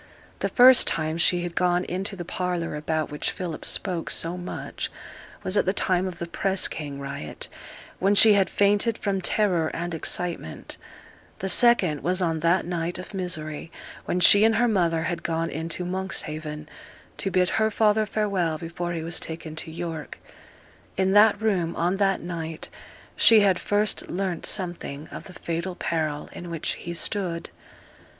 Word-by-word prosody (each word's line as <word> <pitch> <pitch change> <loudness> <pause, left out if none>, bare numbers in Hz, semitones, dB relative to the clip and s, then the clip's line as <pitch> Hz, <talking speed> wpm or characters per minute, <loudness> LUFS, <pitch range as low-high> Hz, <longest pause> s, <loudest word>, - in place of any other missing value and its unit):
The - - -1
first 255 0 +7
time 160 +1 0
she 175 0 +2
had 175 -1 -4
gone 180 0 +1
into 195 +3 -3
the 175 -2 -6
parlour 180 -2 -2
about 155 0 -2
which 150 - -1
Philip 175 -4 -5
spoke 180 -5 -2
so 165 +2 0
much 180 0 -5 0.5
was 185 - -1
at - - +2
the 190 - +2
time 185 -2 +1
of 180 -2 -6
the 170 - -4
press 190 +3 0
gang 145 -3 -6
riot, 140 - -6 0.5
when 195 +2 +3
she 215 +1 +8
had 195 -2 +3
fainted 205 +3 +2
from 195 -2 -1
terror 180 -6 +1
and 170 +1 -3
excitement; 165 - -3 0.6
the 190 - -3
second 190 - +5
was 180 +1 +1
on 165 -3 0
that 170 +3 +2
night 175 0 -3
of 185 +3 -9
misery 160 -5 -5 0.3
when 180 - -1
she 205 +3 +8
and 225 0 +4
her 245 +2 +3
mother 170 -7 +1
had 175 0 -2
gone 165 0 -2
in 160 +2 -4
to 180 +2 -2
Monkshaven, 155 -5 -3 0.5
to 195 - -2
bid 185 -1 +2
her 220 - +3
father 215 0 +2
farewell 195 -7 0
before 175 +2 -4
he 165 -1 -4
was 165 0 0
taken 160 -1 -6
to 160 - -3
York; 165 -2 -6 0.8
in 190 0 +2
that 210 +1 +6
room, 185 -7 0
on 175 +3 0
that 195 -1 +1
night, 165 -2 -5 0.5
she 225 -2 +7
had 195 -3 +3
first 205 0 0
learnt 180 -2 -2
something 170 -6 -3
of - - -9
the 185 - -11
fatal 170 +2 -4
peril 155 -4 -2
in 175 - -8
which 165 -2 -2
he 170 - -6
stood. 170 -2 -3
175 Hz, 170 wpm, -25 LUFS, 165-195 Hz, 0.8 s, she